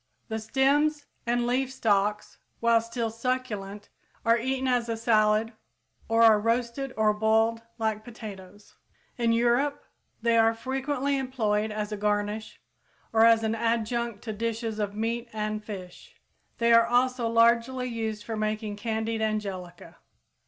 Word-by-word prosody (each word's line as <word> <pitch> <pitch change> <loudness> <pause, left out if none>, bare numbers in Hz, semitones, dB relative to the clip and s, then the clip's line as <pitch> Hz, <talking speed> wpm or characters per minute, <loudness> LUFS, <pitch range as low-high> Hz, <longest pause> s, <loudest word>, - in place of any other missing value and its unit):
_ - - -43
The 220 0 -2
stems 290 +6 +1 0.2
and 240 0 +1
leaf 255 +2 0
stalks, 210 -4 0 0.2
while 230 -1 +4
still 230 0 -3
succulent, 225 -4 -4 0.4
are 230 0 +5
eaten 260 +2 -1
as 245 -2 +1
a 225 - -1
salad 220 0 +2 0.6
or 225 0 +4
are 220 -2 +7
roasted 235 +4 -1
or 215 -1 +3
boiled 220 +2 +2 0.2
like 220 -2 -1
potatoes. 205 -4 -11 0.5
In 235 -1 +2
Europe, 240 +5 +1 0.3
they 230 0 +3
are 225 0 +4
frequently 270 +3 -1
employed 220 -5 0
as 210 0 -3
a 210 - -3
garnish 210 +1 -2 0.5
or 225 0 +6
as 225 -1 +5
an 220 0 0
adjunct 230 -1 -1
to 220 - -4
dishes 225 0 -3
of 205 -1 -2
meat 230 +2 -2
and 215 0 -3
fish. 205 - -10 0.4
They 235 0 +3
are 230 0 +6
also 245 0 +2
largely 235 +2 +3
used 220 -3 -4
for 225 +1 -4
making 215 -1 -2
candied 220 0 -2
angelica. 195 -5 -4
225 Hz, 145 wpm, -27 LUFS, 215-240 Hz, 0.6 s, are